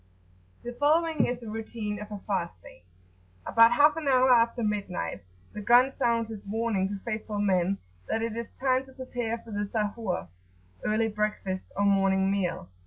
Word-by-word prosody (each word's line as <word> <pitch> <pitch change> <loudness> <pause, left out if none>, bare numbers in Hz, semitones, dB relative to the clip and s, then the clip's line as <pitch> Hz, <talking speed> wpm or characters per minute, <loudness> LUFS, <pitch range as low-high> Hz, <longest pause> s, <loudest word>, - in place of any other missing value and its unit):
The 240 - -5
following 315 +4 +2
is 245 0 -3
the 230 - -7
routine 215 -1 -5
of 210 0 -9
a 205 -2 -6
fast 175 - -2
day. 85 - -14 0.6
About 230 +1 +6
half 295 +3 +5
an 315 -3 -4
hour 260 -1 +5
after 235 0 +3
midnight, 200 - -2 0.3
the 210 - -6
gun 245 +5 +5
sounds 235 -4 0
its 210 -2 -8
warning 210 -2 -1
to 200 +1 -4
faithful 215 -2 -3
men 195 -1 +1 0.3
that 225 - 0
it 230 -1 -2
is 235 0 -5
time 260 -1 +1
to 265 - -15
prepare 245 -3 -3
for 230 - -13
the 205 0 -2
"Sahur," 205 - -2 0.6
(early 220 +1 +1
breakfast) 210 -3 -3
or 200 - +2
morning 195 -1 +3
meal. 180 - -1
220 Hz, 175 wpm, -28 LUFS, 200-240 Hz, 0.6 s, About